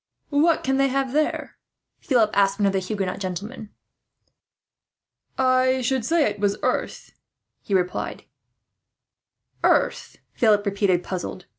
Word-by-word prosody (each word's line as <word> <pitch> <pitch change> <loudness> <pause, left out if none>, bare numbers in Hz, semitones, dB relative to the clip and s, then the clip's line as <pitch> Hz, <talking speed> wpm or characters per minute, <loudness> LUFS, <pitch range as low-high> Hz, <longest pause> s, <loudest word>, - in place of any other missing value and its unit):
"What 310 +3 +3
can 265 0 +1
they 275 0 +3
have 270 -1 -1
there?" 305 +1 -1 0.4
Philip 230 -6 +2
asked 195 -1 +2
one 205 - +1
of 195 - +2
the 190 - +1
Huguenot 190 -1 -3
gentlemen. 200 +4 -6 1.7
"I 255 0 +3
should 255 0 0
say 325 +6 +2
it 205 -1 -4
was 200 0 +1
earth," - - -2 0.5
he 200 - -2
replied 180 -1 -2 1.4
"Earth?" - - +1 0.2
Philip 215 -4 +3
repeated, 195 -3 +1
puzzled. 185 0 -5
215 Hz, 125 wpm, -23 LUFS, 195-260 Hz, 1.7 s, What